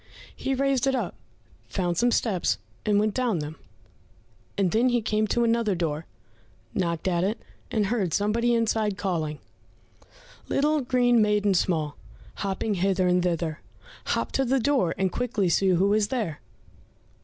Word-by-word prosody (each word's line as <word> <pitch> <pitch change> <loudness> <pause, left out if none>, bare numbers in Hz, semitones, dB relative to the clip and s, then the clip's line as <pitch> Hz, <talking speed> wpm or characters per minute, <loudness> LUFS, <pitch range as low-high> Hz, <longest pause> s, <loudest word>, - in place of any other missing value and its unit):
He 270 - -2
raised 275 -1 +1
it 265 - +2
up, - - -2 0.6
found 175 -3 -1
some 240 +7 +3
steps, 180 - +1 0.3
and 205 -1 +4
went 215 0 +1
down 245 -7 0
them, 150 0 -5 1.0
and 190 -3 +2
then 235 +4 +3
he 240 -1 +2
came 215 -1 0
to 235 +3 +1
another 230 -3 +2
door, 160 -2 -2 0.7
knocked 170 -1 -1
at 175 -1 +1
it, 210 +5 -1 0.3
and 215 -2 +1
heard 200 -5 0
somebody 230 +6 +1
inside 220 -3 0
calling, 160 -7 -2 1.1
"Little 300 +2 +2
green 245 -2 +3
maiden 210 -1 +2
small, 160 -5 0 0.4
Hopping 200 +2 -2
hither 190 0 +1
and 180 0 +3
thither; 170 -3 -1 0.5
Hop - - -1
to 270 - +1
the 265 +1 +2
door, 250 -8 +1
And 190 0 +1
quickly 230 -6 0
see 195 +3 +2
who 190 +3 +3
is 210 -1 +2
there." 215 - -3
205 Hz, 155 wpm, -26 LUFS, 180-235 Hz, 1.1 s, and